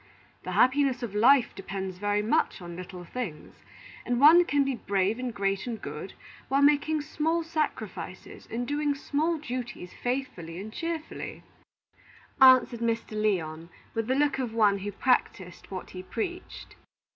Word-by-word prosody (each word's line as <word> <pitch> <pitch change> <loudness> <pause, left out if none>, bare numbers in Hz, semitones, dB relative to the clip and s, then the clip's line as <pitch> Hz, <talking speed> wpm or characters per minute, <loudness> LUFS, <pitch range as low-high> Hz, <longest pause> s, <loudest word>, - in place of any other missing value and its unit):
The - - -5
happiness 260 -1 +3
of 225 -4 -4
life 245 +5 +5
depends 190 -1 -6
very 205 +1 +1
much 215 - +1
on 175 -2 -8
little 180 0 -8
things; 175 -5 -6 0.5
and 245 0 -1
one 325 +5 +8
can 285 -3 +2
be 275 0 -1
brave 200 -1 0
and 255 -1 -3
great 195 +1 -1
and 230 -3 -4
good 150 +5 -7 0.3
while 275 +2 +2
making 295 +1 +3
small 320 +2 0
sacrifices 320 -1 -4
and 240 +2 -3
doing 290 0 0
small 305 +4 0
duties 245 - -6
faithfully 245 -10 -4
and 215 +3 -8
cheerfully," 330 +1 -5 1.0
answered 255 -2 +7
Mr. 230 -1 -1
Lyon, 170 -7 -1 0.2
with 225 -1 -2
the 260 - +1
look 285 -1 +2
of 240 -4 -3
one 205 -3 +4
who 205 +2 -4
practised 200 -5 -1
what 185 -2 -7
he 185 - -7
preached. 350 - -6
240 Hz, 150 wpm, -28 LUFS, 195-280 Hz, 1.0 s, one